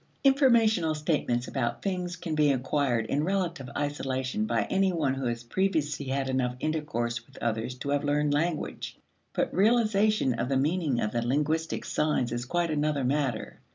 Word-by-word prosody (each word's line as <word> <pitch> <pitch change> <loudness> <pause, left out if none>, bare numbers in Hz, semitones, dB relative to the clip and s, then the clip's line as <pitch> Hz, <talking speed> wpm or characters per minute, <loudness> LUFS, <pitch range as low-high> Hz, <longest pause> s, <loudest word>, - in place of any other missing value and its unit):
Informational 230 - +4
statements 145 -5 0
about 120 -4 -2
things 180 -2 -2
can 165 -2 -5
be 150 -2 +4
acquired 130 -3 0
in 145 +6 0
relative 170 -7 -1
isolation 145 +5 -2
by - - +1
any 195 0 +1
one 155 -6 0
who 130 -3 -1
previously 150 -4 0
has 135 +1 0
had 135 -1 -1
enough 125 -1 0
intercourse 120 -7 -2
with - - -18
others 115 +2 -2
to 135 +2 -6
have 145 0 +1
learned 145 0 +1
language. 155 +2 -2 0.3
But - - -1
realization 215 - +3
of 120 +2 -2
the 135 - +2
meaning 150 -2 +1
of 105 - -1
the 120 - -1
linguistic 150 +6 0
signs 150 -6 0
is 120 0 -3
quite 170 +4 0
another 150 -2 0
matter. 130 -3 -1
145 Hz, 165 wpm, -28 LUFS, 130-175 Hz, 0.3 s, Informational